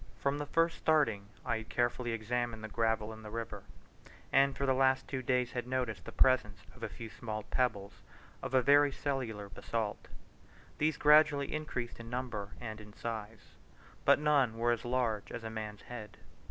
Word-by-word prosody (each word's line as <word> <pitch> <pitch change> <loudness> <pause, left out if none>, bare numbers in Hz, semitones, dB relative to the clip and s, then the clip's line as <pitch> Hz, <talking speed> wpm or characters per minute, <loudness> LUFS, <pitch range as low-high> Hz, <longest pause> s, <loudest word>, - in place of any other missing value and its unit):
From 140 +1 0
the 145 - -3
first 165 +3 +2
starting 145 -11 +2 0.2
I 115 - +1
had 110 -1 -8
carefully 120 0 0
examined 115 0 -2
the - - -3
gravel 110 -1 0
in 110 - -11
the 105 - -8
river, 115 +1 -5 0.7
and 135 0 +4
for 140 - 0
the 135 - +3
two 130 - +2
last 130 +1 +2
days 125 -2 +2
had 125 -1 -3
noticed 125 -7 -2
the - - -7
presence 130 -6 +3 0.2
of - - -16
a - - -3
few 115 -1 -8
small 110 -3 -5
pebbles 105 -6 -1 0.4
of 130 - -2
a 130 - +5
very 145 +2 +6
cellular 125 -8 -3
basalt. 110 +1 -3 0.7
These 155 +1 +2
gradually 150 -1 +5
increased 130 -7 -4
in 115 0 -8
number 120 -5 -3
and 110 -3 -6
in 105 0 -13
size, 110 -2 -6 0.5
but - - +6
none 145 -6 +3
were 120 +1 +2
as 120 -1 -1
large 120 -4 0
as 120 - -5
a 110 - -5
man's 105 -2 -6
head. 115 -4 -8
120 Hz, 180 wpm, -33 LUFS, 110-135 Hz, 0.7 s, very